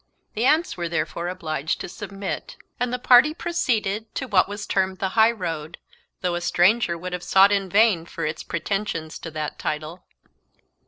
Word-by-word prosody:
The 230 +4 +1
aunts 315 +4 +2
were 170 -1 -3
therefore 165 +1 -2
obliged 155 -4 -3
to - - -5
submit, 195 0 -6 0.2
and 245 0 0
the 250 - -1
party 250 +5 +5
proceeded 220 - -1
to 265 - -2
what 195 -4 +3
was 205 +1 -5
termed 190 -1 0
the 190 - -1
high 220 +3 +5
road, 170 -7 -4 0.4
though 180 -1 0
a 175 - -2
stranger 175 +1 +3
would 180 +2 -6
have 180 - -3
sought 195 +2 +5
in 195 -2 0
vain 200 -4 +3
for 165 - -4
its 155 +1 -3
pretensions 170 -2 -3
to 165 - -7
that 155 -1 -5
title. 155 +3 -4
190 Hz, 175 wpm, -24 LUFS, 170-220 Hz, 0.4 s, party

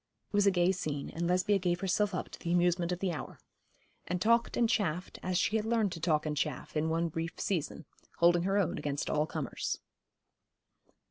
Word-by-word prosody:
It - - -36
was 205 0 +4
a - - +9
gay 180 -1 +3
scene, 150 -6 -3
and 170 +1 -2
Lesbia 185 +3 +2
gave 175 -1 0
herself 195 +1 +1
up - - -3
to - - -11
the 170 - -3
amusement 175 0 +2
of 180 - -1
the 190 -2 +1
hour, 155 - -6 0.7
and 180 +1 -1
talked 230 +4 +2
and 235 - +4
chaffed 185 -5 -1
as 185 -1 -1
she 215 +3 +2
had 215 - -1
learned 225 -4 +2
to 170 - -6
talk 155 -2 +1
and 150 -1 -1
chaff 145 -1 -3
in 155 +1 +1
one 165 +1 +1
brief 165 +1 -4
season, 165 -3 -2 0.3
holding 175 0 +5
her 195 +3 +1
own 200 -4 +1
against 145 -1 -2
all 150 +1 +1
comers. 155 -6 -3
175 Hz, 205 wpm, -31 LUFS, 160-195 Hz, 0.7 s, a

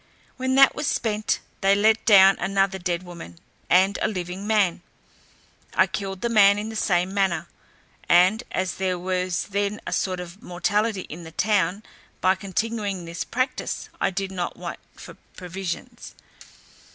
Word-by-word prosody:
When 260 0 -1
that 275 0 +7
was 300 - -3
spent, 215 -1 -1 0.2
they 195 0 +4
letdown 205 -2 +5
another 195 +1 0
dead 175 0 -2
woman, 170 - -10 0.3
and 190 +3 +4
a - - +2
living 185 0 -5
man; 200 -6 +2 0.9
I - - +5
killed 195 -2 -5
the 235 - 0
man 205 -3 +5
in 210 +1 -4
the 225 - -7
same 180 -3 +1
manner, 195 -3 0 0.6
and, 185 +6 +5
as 185 -1 -2
there 185 -1 -1
was 180 0 -1
then 200 +1 -1
a - - -3
sort 185 -1 -1
of 180 +3 -9
mortality 205 +3 -1
in 170 0 -9
the 160 - -10
town, 195 +1 0 0.4
by 185 +1 +4
continuing 200 0 -3
this 170 0 -4
practice 255 +2 -3
I - - +3
did 195 +1 -4
not 180 -2 -4
want - - -6 0.2
for - - -12 0.2
provisions. 180 0 -6
195 Hz, 150 wpm, -24 LUFS, 180-210 Hz, 0.9 s, that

